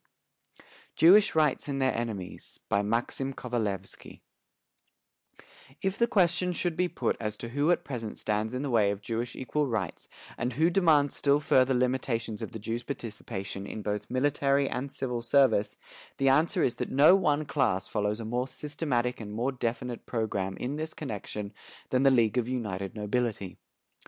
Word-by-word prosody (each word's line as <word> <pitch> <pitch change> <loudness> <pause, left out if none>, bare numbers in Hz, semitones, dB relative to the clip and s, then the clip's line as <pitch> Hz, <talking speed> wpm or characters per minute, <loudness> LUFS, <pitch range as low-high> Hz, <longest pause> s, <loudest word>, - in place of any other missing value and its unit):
_ - - -19 0.3
JEWISH 200 +4 +6
RIGHTS 150 -3 +2
AND 135 -1 -2
THEIR 130 -1 +2
ENEMIES 110 -6 -5
BY 100 - +2
MAXIM 120 +5 -1
KOVALEVSKY 105 -6 -4 1.6
If 195 0 -1
the 235 - +4
question 180 -4 +2
should 175 -1 -1
be 180 +2 +1
put - - -1
as 105 -1 -3
to 115 - -6
who 145 +6 +1
at 175 - +2
present 115 -6 -5
stands 110 +3 -1
in 130 - -2
the 140 - -2
way 110 -4 +4
of 100 0 -4
Jewish 115 +2 -3
equal 145 +3 -1
rights 105 -9 -3 0.3
and 125 +2 -1
who 160 +7 +3
demands 155 -6 +3
still 140 0 +3
further 130 -3 +3
limitations 125 -3 -1
of - - -5
the - - -6
Jews' 115 +2 -3
participation 105 -6 -5
in 110 - -6
both 105 0 -3
military 140 +1 +2
and 135 +2 -3
civil 125 -4 -3
service, 115 -4 +3 0.4
the 135 0 +3
answer 150 +5 +3
is 120 -1 0
that - - -3
no 150 +7 +7
one 150 -5 +1
class 110 -11 0
follows 105 0 -1
a 115 - -5
more 125 +3 -1
systematic 135 -5 -2
and 105 -1 -7
more 120 +5 -1
definite 120 -1 -4
programme 100 -5 -2
in 135 +4 -3
this 155 0 -5
connection 105 -5 -5 0.4
than 130 - +2
the 135 - +6
League 120 -2 +3
of 120 0 -2
United 100 -7 -3
Nobility. 105 -2 -2
125 Hz, 170 wpm, -29 LUFS, 110-140 Hz, 1.6 s, no